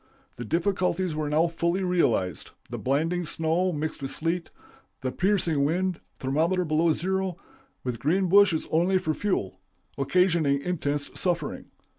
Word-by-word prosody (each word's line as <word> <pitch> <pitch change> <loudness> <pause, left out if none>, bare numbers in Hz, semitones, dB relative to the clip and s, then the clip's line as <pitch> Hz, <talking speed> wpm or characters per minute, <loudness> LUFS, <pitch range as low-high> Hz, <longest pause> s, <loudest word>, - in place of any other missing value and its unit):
The 120 - -5
difficulties 180 - 0
were 150 -1 -2
now 155 +3 +3
fully 170 +2 -1
realized; 120 - +1 0.2
the - - -4
blinding 165 +7 0
snow, 165 +3 0
mixed 155 -1 -4
with 135 - -3
sleet; 165 +5 -1 0.5
the 130 -1 -2
piercing 175 -6 +1
wind, 180 +4 0 0.2
thermometer 165 +7 +1
below 160 +1 +2
zero 190 +1 -1 0.5
with 125 -3 -3
green 180 +9 +1
bushes 195 -3 +4
only 175 +4 +3
for 160 -4 -1
fuel 100 - -2 0.4
occasioning 160 -2 +2
intense 145 -5 -2
suffering. 175 -2 -2
165 Hz, 135 wpm, -26 LUFS, 145-180 Hz, 0.5 s, bushes